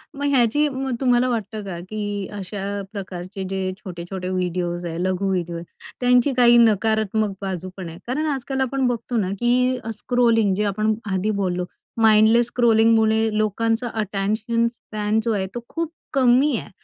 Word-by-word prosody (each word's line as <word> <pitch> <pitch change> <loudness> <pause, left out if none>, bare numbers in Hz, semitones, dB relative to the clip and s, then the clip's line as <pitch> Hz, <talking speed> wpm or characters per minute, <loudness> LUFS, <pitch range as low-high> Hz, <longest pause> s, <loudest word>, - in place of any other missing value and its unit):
मग 285 +1 -3
ह्याची 275 +2 +3
मग 265 -2 -3
तुम्हाला 250 -1 +3
वाटतं 220 -2 -3
का 180 -3 -5
की 205 -2 -3
अशा 195 +1 -6 0.3
प्रकारचे 190 -1 -6
जे 190 -1 -2
छोटे-छोटे 180 -1 -6
व्हिडिओज 180 -1 -2
आहे, 165 -1 -4
लघु 185 +1 0
व्हिडिओ 175 -2 -2
आहे, 170 - -5 0.4
त्यांची 250 +2 +3
काही 240 -1 +7
नकारात्मक 220 -1 +2
बाजू 185 -2 -4
पण 180 -3 -6
आहे. 165 - -10
कारण 280 +6 -1
आजकाल 265 0 -3
आपण 265 0 0
बघतो 240 0 -2
ना 195 -4 0
की 250 +1 +2
अ, 225 - -5
स्क्रोलिंग 225 -2 +2
जे 210 - 0
आपण 215 +2 +1 0.2
आधी 190 +3 0
बोललो 180 -1 -1 0.4
माइंडलेस 220 +2 +5
स्क्रोलिंग 230 -2 +4 0.4
लोकांचा 225 +3 0
अटेंशन 215 +3 0
स्पॅन 215 -2 -2
जो 230 - 0
आहे 190 -2 -1
तो - - -2
खूप 330 -1 -3 0.2
कमी 260 +1 +4
आहे. - - -7
215 Hz, 160 wpm, -22 LUFS, 190-240 Hz, 0.4 s, काही